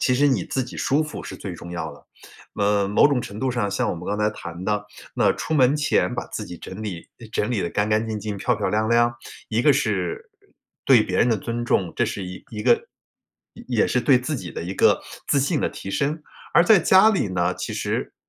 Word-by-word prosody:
其 125 - +2
实 145 +3 +4
你 120 -10 +1
自 130 - -2
己 125 - -9
舒 145 +4 +1
服 155 0 -6
是 - - -8
最 95 - -6
重 85 0 -9
要 85 - -4
的。 - - -17 0.5
呃， 100 -1 +2
某 105 +7 +5
种 140 -4 +1
程 105 -2 -8
度 130 - 0
上 120 -5 -1
像 100 - 0
我 - - -2
们 85 - -8
刚 105 - -1
才 105 0 +2
谈 85 -3 -8
的， 105 0 -1 0.3
那 - - +3
出 - - -5
门 135 -2 +4
前 150 -4 +1
把 120 - -3
自 105 - -5
己 90 - -9
整 95 +5 -9
理 90 -6 -6 0.2
整 105 +1 0
理 115 -6 0
得 85 - -1
干 105 +1 0
干 110 +1 +1
净 110 -1 -3
净、 105 -1 -4
漂 125 +4 +1
漂 105 - -2
亮 110 +1 0
亮， 120 0 +3 0.4
一 115 +1 +1
个 145 - +5
是 430 - -2 0.5
对 125 -5 +6
别 90 -3 -3
人 120 - +4
的 115 - +2
尊 120 +4 -4
重， 95 -7 +1
这 - - +2
是 95 - -4
一 90 0 -9
一 105 -1 -5
个 - - +3 0.7
也 - - -12
也 - - +4
是 125 - +1
对 130 0 +5
自 145 +3 -3
己 90 -6 -7
的 - - -5
一 90 - -4
个 - - +3 0.2
自 140 - +2
信 145 +4 0
的 - - +1
提 95 - -8
升。 150 +8 -1 0.3
而 170 - +7
在 210 +2 +7
家 190 +5 +6
里 195 - 0
呢， 90 -1 0
其 - - -5
实 - - -3
110 Hz, 260 characters per minute, -23 LUFS, 100-135 Hz, 0.7 s, 而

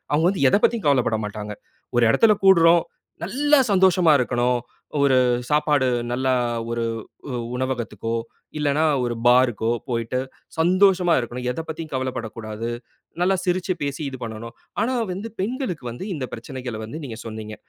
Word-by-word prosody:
அவுங்க 155 +3 +3
வந்து 190 -8 -1
எத - - +5
பத்தியும் 230 -8 +2
கவலப்பட 125 -5 +3
மாட்டாங்க. 105 0 -6 0.4
ஒரு 120 - +5
எடத்தில 220 - +5
கூடுறோம். 170 -3 +6 0.4
நல்லா 290 +2 +3
சந்தோஷமா 185 -4 +5
இருக்கணும். 125 0 +1 0.4
ஒரு 135 -2 +4 0.3
சாப்பாடு 150 -2 +2 0.2
நல்ல 130 +2 -1 0.4
ஒரு 115 0 -1 0.5
உ - - -6 0.3
உணவகத்துக்கோ, 120 -4 -3 0.5
இல்லன்னா 150 +1 +1 0.2
ஒரு 120 -1 -1
பாருக்கோ 120 -2 +4 0.2
போய்ட்டு 115 0 -1 0.4
சந்தோஷமா 180 +1 +4
இருக்கணும். 125 +1 -5
எதை 145 +6 -3
பத்தி 160 +1 -5
கவலப்படக்கூடாது. 115 -3 -4 0.5
நல்லா 190 +2 +3
சிரிச்சு 185 +1 0
பேசி 140 0 -3
இது 130 -1 -7
பண்ணணும். 115 +1 -7 0.3
ஆனா 255 +3 0 0.2
வந்து 200 +5 -5
பெண்களுக்கு 220 - -3
வந்து 120 +10 -7
இந்த 135 -5 -3
பிரச்சனைகள 125 0 -6
வந்து 130 +9 -7
நீங்க 115 -5 -7
சொன்னீங்க. 110 -1 -6
130 Hz, 140 wpm, -23 LUFS, 120-180 Hz, 0.5 s, கூடுறோம்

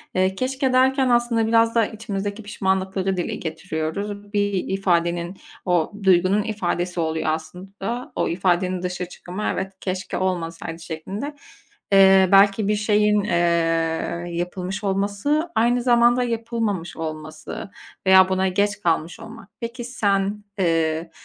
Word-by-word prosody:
Eee, 185 +1 +2
"keşke" 260 +3 -1
derken 265 +1 +3
aslında 240 -2 +2
biraz 230 0 +3
da 230 -2 +4
içimizdeki 205 -1 -5
pişmanlıkları 190 -1 -1
dile 175 - -2
getiriyoruz. 195 +5 -5
Bir 205 0 +1
ifadenin 175 -2 0 0.3
o 175 -3 +1
duygunun 190 +2 +4
ifadesi 180 -4 -2
oluyor 160 -1 -1
aslında 195 +9 -5
o - - 0
ifadenin 180 +1 0
dışa 180 0 -3
çıkımı, 180 +3 -8
evet, 190 0 -4
"Keşke 185 0 -3
olmasaydı." 165 -3 -3
şeklinde. 195 - -6 0.6
Eee, 190 -1 +6
belki 200 +1 +5
bir 210 - +2
şeyin, 210 0 +2
eee, 170 -1 0
yapılmış 180 +3 -4
olması, 205 - 0
aynı 240 +2 +3
zamanda 240 0 +4
yapılmamış 230 -6 -2
olması 155 +3 -6 0.4
veya 190 0 +7
buna 190 0 +1
geç 205 +3 0
kalmış 165 -1 0
olmak. 225 -2 -11
Peki 235 +1 -5
sen, 205 -4 0 0.2
eee, 165 -2 +1
195 Hz, 125 wpm, -22 LUFS, 175-215 Hz, 0.6 s, veya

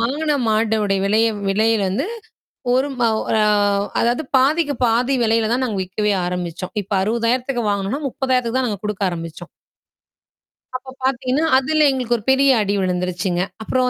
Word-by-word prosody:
வாங்குன 295 +6 0
மாட்டுடைய 215 -2 +1
விலையே 220 +3 +3 0.2
விலையில 215 +1 +2
இருந்து 190 - -1 0.7
ஒரு 260 +2 +2
மவ் 225 -2 +2 0.2
அ - - +3 0.6
அதாவது 240 +6 +1
பாதிக்கு 290 +3 +2
பாதி 240 +3 +1
விலையில 225 -1 +2
தான் 255 +2 0
நாங்க 220 -5 -3
விக்கவே 210 +3 -1
ஆரம்பிச்சோம். 180 0 -4
இப்ப 200 +1 -6
ரூ.60000க்கு 235 +3 0
வாங்குனோன்னா, 200 +7 -2
ரூ.30000க்கு 255 -2 -1
தான் 255 - 0
நாங்க 205 -2 -5
குடுக்க 210 -1 -3
ஆரம்பிச்சோம். 165 0 -7 1.3
அப்பப் 260 +1 -14
பார்த்தீங்கன்னா, 265 +3 0
அதுல 305 +3 +2
எங்களுக்கு 250 -3 0
ஒரு 215 - -12
பெரிய 265 -1 +4
அடி 200 0 0
விழுந்திருச்சுங்க. 180 0 -1 0.2
அப்புறம் 255 +2 +1
230 Hz, 145 wpm, -20 LUFS, 200-260 Hz, 1.3 s, பெரிய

